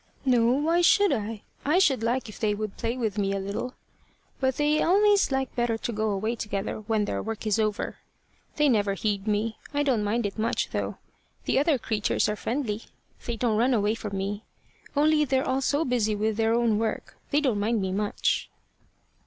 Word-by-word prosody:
"No! 245 -3 +4
Why 320 +5 +2
should 405 0 +5
I? 215 -3 -4 0.2
I 300 +5 +2
should 280 -10 +3
like 240 +3 0
if 215 - -10
they 210 -2 +1
would 215 -1 -4
play 230 +2 -2
with 220 -4 -1
me 195 -1 0
a 195 - -1
little; 200 +6 -4 0.6
but 260 -2 +1
they 295 +1 +2
always 405 0 +4
like 265 -1 -1
better 240 -2 0
to 235 - -3
go 215 0 0
away 215 +4 -1
together 205 -3 -3
when 215 -1 0
their - - -2
work 225 0 -5
is 215 0 +1
over. 215 -1 -1 0.6
They 295 0 +3
never 205 -6 +2
heed 205 0 -2
me. 215 +1 -1 0.2
I 290 - +2
don't 250 -7 +1
mind 220 +2 0
it 205 +2 -4
much, 230 +2 0
though. - - -3 0.5
The - - +2
other 290 0 +3
creatures 215 -3 0
are 210 - -1
friendly. 230 -1 -3 0.4
They 235 -1 -2
don't 225 -2 +1
run 245 +3 +3
away 210 0 +2
from 210 -3 -5
me. 200 +2 -3 0.5
Only 300 +1 +4
they're 265 -2 0
all 260 +1 +1
so 290 +4 +1
busy 225 -4 +1
with 215 +1 0
their 225 +1 +2
own 230 -3 +2
work, 225 0 -3
they 290 - +3
don't 255 -8 +1
mind 220 +2 +1
me 190 -1 -1
much." 205 +2 0
225 Hz, 200 wpm, -26 LUFS, 210-265 Hz, 0.6 s, should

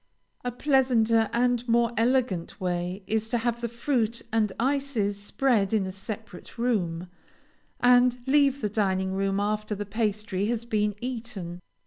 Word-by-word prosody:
A 245 - -2
pleasanter 240 -4 +3
and 245 0 +1
more 235 0 +3
elegant 230 -7 0
way, 180 +1 -2
is 220 +1 -1
to 240 - +1
have 235 0 -1
the 235 - -2
fruit 235 -1 -1
and 215 -3 +2
ices 245 -6 0
spread 220 -2 +1
in 205 -3 +1
a 190 - -4
separate 205 +1 -8
room, 185 -8 -1 0.7
and 245 0 +5
leave 280 0 +3
the 210 - 0
dining 190 -2 0
room 195 0 0
after 210 +1 -1
the 205 +1 -4
pastry 210 -2 -1
has 235 0 -2
been 210 -3 0
eaten. 225 -8 -5
220 Hz, 145 wpm, -27 LUFS, 200-245 Hz, 0.7 s, and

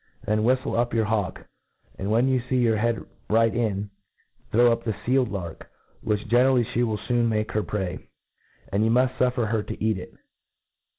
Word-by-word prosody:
Then 105 +1 +1
whiftle 130 +3 +1
up 120 0 0
your 110 -1 +2
hawk 105 -3 -1
j - - -20 0.5
and 95 - -3
when 115 +4 +3
you 130 -1 +2
fee 125 0 +1
her 110 -1 +2
head 115 +1 0 0.2
right 115 +1 +3
in, 105 -4 -1 0.6
throw 120 +2 +5
up 115 - -1
the 110 - -1
fielcd 125 +4 0
lark, 90 -5 -6 0.3
which 105 -1 -1
generally 125 +1 +4
Ihe 120 +3 -1
will 110 -1 -1
foon 120 -1 +2
make 110 -1 -1
her 110 - 0
prey; 95 -4 -4 0.7
and 100 +2 +2
you 110 - +2
muft 125 +2 +2
fuflfer 125 -3 +1
her 110 -1 +1
to - - -7
eat 110 -3 +1
it. - - -11
115 Hz, 190 wpm, -25 LUFS, 105-120 Hz, 0.7 s, throw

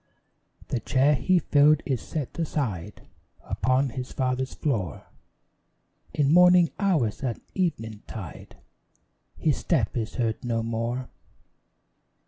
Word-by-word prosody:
The 125 - 0
chair 135 +6 +3
he 185 +6 +2
filled 150 -2 +4
is 130 -5 -1
set 150 0 -5
aside 110 - -3 0.4
Upon 130 +2 +1
his 125 0 -6
father's 130 0 -1
floor; 105 - -2 1.1
In 145 0 +2
morning 180 -1 +6
hours, 165 - +1
at 125 -4 -2 0.2
eventide, 110 - -4 0.8
His - - +1
step - - 0
is 110 -2 -3
heard 115 -1 -1
no 115 -2 -1
more. 115 +2 -3
130 Hz, 110 wpm, -26 LUFS, 115-150 Hz, 1.1 s, morning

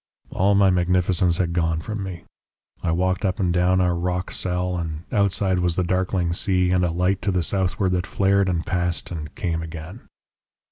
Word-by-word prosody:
"All 100 +2 +2
my 100 -1 +5
magnificence 90 -1 +2
had 85 -2 0
gone 80 -2 0
from 105 +5 -5
me. 95 -3 -6 0.6
I 85 - -1
walked 90 +3 0
up 95 -2 0
and 90 -3 +1
down 90 +1 +3
our 90 -1 +2
rock 90 +1 -2
cell, 90 0 -1
and 80 -2 -4
outside 100 -2 +1
was 90 -2 0
the 95 - +1
darkling 90 -1 0
sea 90 0 +1
and 90 0 +2
a 90 - +2
light 90 +3 0
to - - -1
the 90 -2 0
southward 95 +1 0
that 90 0 -1
flared 100 -1 +2
and 85 -2 -1
passed 90 -1 -1
and 75 -4 -6
came 85 -2 -2
again. 80 +6 -9
90 Hz, 190 wpm, -23 LUFS, 85-95 Hz, 0.6 s, my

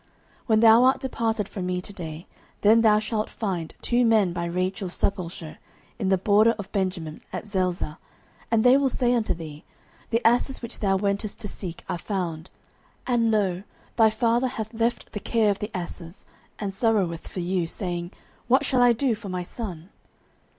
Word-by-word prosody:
09:010:002 - - -35 0.4
When 220 -2 +4
thou 230 +1 +7
art 260 +1 +4
departed 225 -5 -1
from 185 -4 -5
me 180 0 -1
to 195 +3 -7
day, 165 -3 -7 0.4
then 220 +2 +6
thou 215 -2 +5
shalt 215 0 -2
find 180 -7 -4
two 245 0 +2
men 215 -6 +3
by 170 0 -2
Rachel's 185 +2 -2
sepulchre 175 -5 -3 0.4
in 195 -4 0
the 190 - +4
border 210 +4 +4
of 205 -3 -8
Benjamin 180 -5 -2
at - - -5
Zelzah; 185 -6 -2 0.5
and 225 -1 +3
they 255 +2 +7
will 275 -1 +2
say 245 -1 +1
unto 230 -6 +1
thee, 155 -2 -9 0.5
The 230 +1 0
asses 245 +3 +3
which 235 - -6
thou 195 -2 +2
wentest 200 +1 -2
to 210 - -4
seek 180 -4 -7
are 175 - -3
found: 170 -6 -3 0.6
and, 235 -2 +2
lo, 195 -5 +1 0.3
thy 225 -2 +6
father 235 +3 +1
hath 220 -3 -5
left 230 +1 -1
the 210 - -3
care 220 0 +2
of 200 - -3
the 210 - -4
asses, 175 0 -8 0.3
and 200 -2 -4
sorroweth 195 -6 0
for 185 - -5
you, 175 -1 0
saying, 175 -1 -3 0.4
What 255 +3 +4
shall 255 -2 +2
I 245 -1 +6
do 245 +1 +1
for 210 -2 -7
my 180 -1 -3
son? 180 -4 -7
205 Hz, 185 wpm, -25 LUFS, 180-230 Hz, 0.6 s, thou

